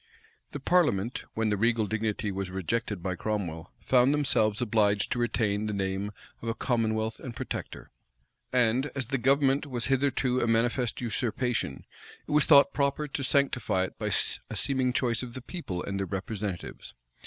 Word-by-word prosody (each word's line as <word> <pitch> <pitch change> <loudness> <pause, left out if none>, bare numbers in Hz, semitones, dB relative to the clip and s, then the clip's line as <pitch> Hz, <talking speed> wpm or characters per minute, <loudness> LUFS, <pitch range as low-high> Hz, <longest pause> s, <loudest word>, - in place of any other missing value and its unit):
The 145 - -5
parliament, 125 - +1
when 110 -1 +1
the 105 - +1
regal 115 +1 +2
dignity 110 -1 -2
was 95 -1 -3
rejected 95 +1 -2
by 95 -1 -1
Cromwell, 90 -4 -3
found 130 +1 +4
themselves 110 -7 +2
obliged 105 -4 +2
to 120 - 0
retain 110 -3 0
the 105 - -2
name 95 +1 -2 0.3
of 115 - -3
a 115 - -1
commonwealth 110 -3 0
and 120 -3 -7
protector; - - -6 0.6
and 125 +2 +3
as 130 -4 -3
the 135 -1 0
government 135 +3 +3
was 125 -4 -2
hitherto 130 -2 +1
a 120 - +1
manifest 115 +2 +1
usurpation, 120 - -2 0.4
it - - -6
was 150 -1 +5
thought 140 -3 +7
proper 140 +1 0
to 135 - -3
sanctify 125 -8 +1
it 95 - -6
by - - -2
a - - -1
seeming 130 -2 +1
choice 120 -2 +1
of 120 -2 -7
the - - -4
people 120 - -5
and 100 0 -3
their 95 - -2
representatives. 100 -1 -5
115 Hz, 165 wpm, -28 LUFS, 105-130 Hz, 0.6 s, thought